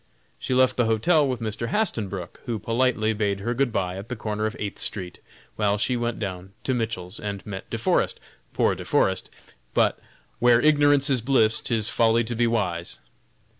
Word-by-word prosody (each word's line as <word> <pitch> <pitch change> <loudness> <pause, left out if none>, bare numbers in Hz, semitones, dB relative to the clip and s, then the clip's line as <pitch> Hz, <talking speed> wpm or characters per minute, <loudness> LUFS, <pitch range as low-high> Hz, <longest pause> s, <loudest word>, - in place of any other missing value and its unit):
She 130 - -2
left 130 0 +3
the 120 - +3
hotel 140 +8 +3
with 125 -3 -3
Mr. 110 +1 -3
Hastenbrook, 100 - -2
who 115 -2 -1
politely 115 0 +1
bade 100 -2 -1
her 120 +4 -1
good 130 0 +1
bye 90 -3 -2
at 100 +3 -8
the 125 - -3
corner 105 -1 -2
of 110 - -5
Eighth 100 -2 -5
street, 90 -3 -2 0.4
while 105 -1 +2
she 125 +4 0
went 120 -1 -2
down 95 -2 -6
to 130 - 0
Mitchell's 110 -6 -3
and 100 -2 -5
met 95 -2 -7
De - - -3
Forest, - - +1 0.3
poor - - +2
De - - -7
Forest! - - +1 0.5
but, - - +2 0.4
"where 120 -1 +5
ignorance 145 -1 +4
is 130 -3 +2
bliss, 115 -3 +3
'tis 110 -3 0
folly 115 0 +3
to 120 +1 -3
be 120 +1 +2
wise." 90 -7 -1
110 Hz, 185 wpm, -25 LUFS, 100-120 Hz, 0.5 s, where